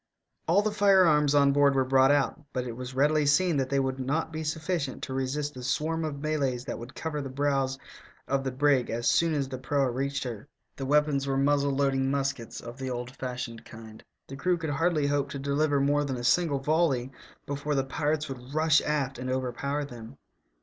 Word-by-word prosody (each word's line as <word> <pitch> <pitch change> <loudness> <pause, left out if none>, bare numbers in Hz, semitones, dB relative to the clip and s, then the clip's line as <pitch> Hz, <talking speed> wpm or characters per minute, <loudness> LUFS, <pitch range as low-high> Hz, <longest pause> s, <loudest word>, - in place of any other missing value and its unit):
All 190 +6 +4
the 215 - 0
firearms 185 -8 +4
on 140 -1 +5
board 140 0 +4
were 130 -1 +2
brought 130 0 +4
out, 145 +2 +1
but 125 -1 -2
it 120 - -4
was 125 +1 -7
readily 150 +2 +3
seen 160 +2 +3
that 135 -1 0
they 140 - +1
would 130 0 -1
not 155 +5 -1
be 160 0 -3
sufficient 155 -2 -3
to 130 - -4
resist 140 +3 -2
the 130 - -9
swarm 155 +6 -1
of 140 -2 -5
Malays 140 -5 -1
that - - -5
would 120 +3 -10
cover 155 -2 -3
the 135 - -5
bows 135 -1 0 0.5
of 135 0 0
the 135 - -1
brig 135 -1 +2
as 120 +1 -2
soon 165 -2 +3
as 140 -2 -1
the 130 -1 -6
proa 135 -1 0
reached 140 +3 -2
her. 120 -1 -6 0.3
The 135 - -5
weapons 145 -1 +2
were 135 0 0
muzzle 140 0 +2
loading 135 -1 +1
muskets 135 -4 -2
of 120 +2 -9
the 130 -1 -3
old 125 0 -4
fashioned 125 -3 -5
kind. 110 -1 -12 0.2
The 135 - -8
crew 180 +5 +1
could 160 -3 -3
hardly 155 +1 +1
hope 140 -1 0
to 140 - -5
deliver 140 +1 +1
more 145 +1 +2
than 135 -3 -3
a 120 - -6
single 155 +2 +2
volley 135 -3 +1 0.3
before 145 +1 -2
the 135 - +2
pirates 150 +2 -1
would 130 0 -8
rush 155 0 +4
aft 135 -4 -2
and 130 0 -4
overpower 130 +3 -2
them. 120 0 -11
140 Hz, 210 wpm, -28 LUFS, 130-150 Hz, 0.5 s, on